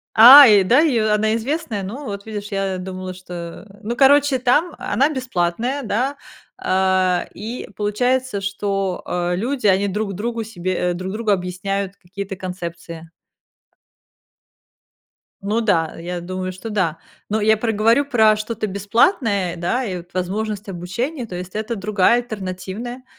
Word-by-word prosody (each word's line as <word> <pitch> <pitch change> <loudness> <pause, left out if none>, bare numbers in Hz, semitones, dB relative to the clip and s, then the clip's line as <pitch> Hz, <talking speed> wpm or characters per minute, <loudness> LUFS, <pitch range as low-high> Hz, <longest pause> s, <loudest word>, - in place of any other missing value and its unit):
А, 265 +6 +11
и 205 -3 +6
да, 250 +10 +4
и 260 -8 +2
она 215 0 +2
известная? 245 -3 -3
Ну, 240 +10 -6
вот 200 -3 -6
видишь, 210 -1 -6
я 195 -1 -1
думала, 185 0 -6
что 175 -1 -8 0.2
Ну, 235 +3 -3
короче, 280 0 +5
там, 280 +7 +1
она 275 +5 +1
бесплатная, 250 - -2
да, 250 +6 -1 0.4
а, 185 - +1
и 225 +5 -6
получается, 245 +2 0
что, 195 -1 -2
э, 175 0 -1
люди, 245 +5 -3
они 200 0 +3
друг 205 +1 -2
другу 230 +4 -3
себе 185 -4 -4 0.2
э, - - -1
друг 185 +2 -5
другу 215 -1 -1
объясняют 195 +1 -2
какие-то 195 +2 -7
концепции. 170 -3 -7 2.3
Ну 210 +4 0
да, 165 -7 +1
я 175 +1 -5
думаю, 185 +1 -4
что 185 +5 -8
да. 185 -7 0 0.3
Но 215 +1 0
я 220 +1 +4
про 225 0 -1
говорю 225 +6 +3
про 220 -6 +4
что-то 215 0 -4
бесплатное, 200 - +1
да, 210 +10 -1
и 185 -5 -3
вот 175 0 -12
возможность 205 +3 -3
обучения, 235 - -4
то 185 -5 -8
есть 180 +1 -7
это 220 +2 -3
другая, 210 +3 +2
альтернативная. 215 +3 -6
205 Hz, 150 wpm, -20 LUFS, 185-235 Hz, 2.3 s, А